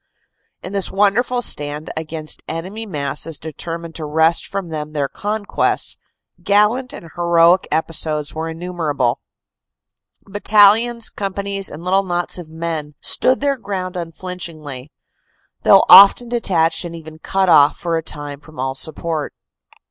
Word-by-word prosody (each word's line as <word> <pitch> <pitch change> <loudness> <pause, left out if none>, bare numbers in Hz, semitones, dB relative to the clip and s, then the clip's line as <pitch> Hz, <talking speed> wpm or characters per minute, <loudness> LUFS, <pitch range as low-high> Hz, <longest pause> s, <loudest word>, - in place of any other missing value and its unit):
In 185 - -7
this 195 -2 0
wonderful 230 +5 +1
stand 150 -3 +1
against 155 -1 -3
enemy 195 +7 -5
masses 150 -1 -3
determined 165 +2 -6
to 160 - -5
wrest 160 +2 +2
from 195 -3 -5
them 155 -1 -6
their 145 -2 -1
conquests, 205 +5 -2 0.5
gallant 210 +5 +2
and 165 - -11
heroic 170 +1 +3
episodes 155 -1 -1
were 160 +1 -4
innumerable. 160 -7 -2 1.0
Battalions, 215 +3 +3
companies 195 0 -2
and 155 +3 -10
little 190 +2 +2
knots 175 -1 -3
of 165 -3 -10
men 160 -2 -5
stood 255 +1 +1
their 280 -1 0
ground 195 -4 -5
unflinch 180 +1 -5
ingly, 145 -4 -9 0.7
though - - +6
often 200 +4 +8
detached 175 -9 +1
and 170 -1 -7
even 160 -1 -11
cut 190 +3 0
off 150 -4 +5
for 170 -1 -2
a 165 - -1
time 145 -2 -6
from 155 -2 -15
all 130 0 -2
support. 155 +2 -2
170 Hz, 135 wpm, -18 LUFS, 155-195 Hz, 1.0 s, often